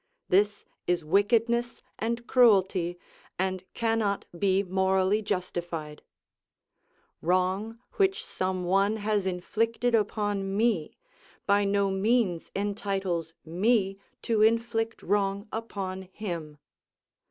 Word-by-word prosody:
This 205 +2 +2 0.2
is 175 -3 +1
wickedness 230 +6 +2 0.2
and 235 +2 -2
cruelty, 190 -8 +3 0.4
and 185 0 -1
cannot 225 -3 0
be 195 +2 +2
morally 190 +2 +2
justified. 175 -6 -4 1.2
Wrong 185 +6 0 0.2
which 385 -1 +2
some 185 -1 -2
one 195 +4 +2
has 205 -2 0
inflicted 225 +6 0
upon 205 -2 0
me 215 -9 +1 0.5
by 200 0 +3
no 200 0 +2
means 195 -3 +1
entitles 195 -5 -2
me 195 +3 +1 0.2
to 225 -2 +1
inflict 225 0 +1
wrong 200 0 0
upon 195 -4 -4
him. 170 -8 -5
200 Hz, 95 wpm, -28 LUFS, 185-220 Hz, 1.2 s, cruelty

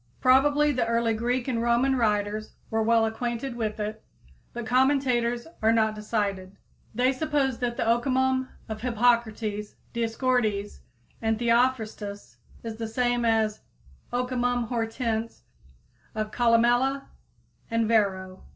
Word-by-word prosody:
Probably 290 +3 +4
the 250 -4 0
early 230 0 +1
Greek 240 +3 -1
and 235 -3 -1
Roman 240 +3 +2
writers 210 -2 0 0.2
were 225 0 +1
well 225 0 +3
acquainted 235 +3 -3
with 220 -2 -3
it, 215 +1 -4 0.5
but 240 -1 -6
commentators 250 -2 +2 0.2
are 220 +1 +4
not 220 -1 +2
decided. 205 -3 -3 0.4
They 250 +3 +3
suppose 280 -3 0
that 240 -2 -2
the - - 0
Okimon 260 +2 +1 0.2
of 215 -1 -6
Hippocrates, 225 -3 0 0.2
Dioscorides 225 -3 0 0.4
and 225 -1 +1
Theophrastus 230 -4 0 0.3
is 225 -1 -6
the 225 -1 -4
same 245 +1 0
as 220 -2 +1 0.5
Ocimum 245 -1 -1
hortense 225 - -2 0.7
of 215 0 -3
Columella 245 +4 +3 0.7
and 230 -1 +1
Varro. 190 -4 0
230 Hz, 120 wpm, -26 LUFS, 220-250 Hz, 0.7 s, Probably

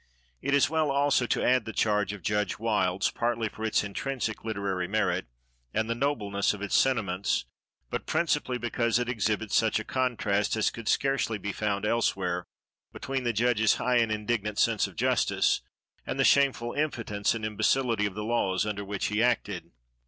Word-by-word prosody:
It 140 - +1
is 140 - +4
well, 160 -1 +1
also, 140 -2 +2
to - - 0
add 125 -2 +3
the 110 - -6
charge 105 -2 +1
of 105 -2 -9
Judge 105 0 0
Wilds, 100 -4 +1
partly 115 -2 -1
for 110 - -9
its 110 -2 +1
intrinsic 115 +2 -3
literary 100 -5 -2
merit, 105 - 0 0.5
and 110 - +1
the 115 - 0
nobleness 105 -7 0
of 100 - -11
its 105 - -4
sentiments, 100 - +1 0.5
but - - -4
principally 150 -6 0
because 115 -1 0
it 120 0 -1
exhibits 110 -3 -1
such 110 -1 +3
a - - -4
contrast 110 -6 0
as 110 - +1
could 115 -2 -9
scarcely 135 -5 +1
be 100 0 -4
found 100 0 -2
elsewhere, 90 -6 0 0.5
between 135 -1 -4
the 120 - +2
judge's 115 -1 +2
high 125 +1 +1
and 115 -2 +2
indignant 105 -1 -2
sense - - +2
of - - -14
justice, - - +2 0.4
and - - -4
the - - +4
shameful 135 -4 +3
impotence 115 -9 -1
and 110 -1 -4
imbecility 110 +1 +1
of 100 - -8
the 105 - -4
laws 105 -5 +1
under 105 -1 -3
which 100 0 -3
he 105 +1 0
acted. 105 -8 0
110 Hz, 175 wpm, -28 LUFS, 105-125 Hz, 0.5 s, is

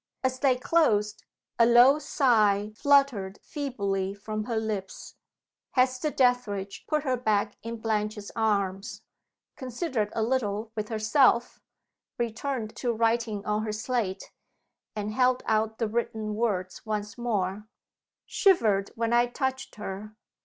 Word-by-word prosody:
As 260 0 0
they 265 -2 +3
closed, 215 -8 +1 0.3
a 230 - +7
low 245 +5 +7
sigh 215 -8 +2
fluttered 260 -8 +2
feebly 200 -9 -3
from 215 +1 -5
her 235 - -3
lips. 210 -4 -4 0.6
Hester 255 +3 +2
Dethridge 245 -8 0
put 305 -2 0
her 260 -3 +1
back 215 -3 0
in 230 +1 -5
Blanche's 215 -1 -2
arms 200 -1 -1 0.5
considered 255 -4 -3
a 225 - +1
little 220 -3 -1
with 215 -1 -3
herself 235 +2 +2 0.6
returned 235 0 -3
to 245 - 0
writing 225 -2 0
on 210 0 0
her 215 - -2
slate 215 -3 -3 0.6
and 210 0 -3
held 255 +1 +2
out 220 0 0
the 225 - 0
written 220 -1 -2
words 205 -5 -2
once 210 -1 -3
more: 210 -4 -2 0.6
"Shivered 215 - +3
when 230 0 -1
I 240 0 +4
touched 265 +1 -3
her. 210 +1 -7
220 Hz, 125 wpm, -27 LUFS, 210-250 Hz, 0.6 s, a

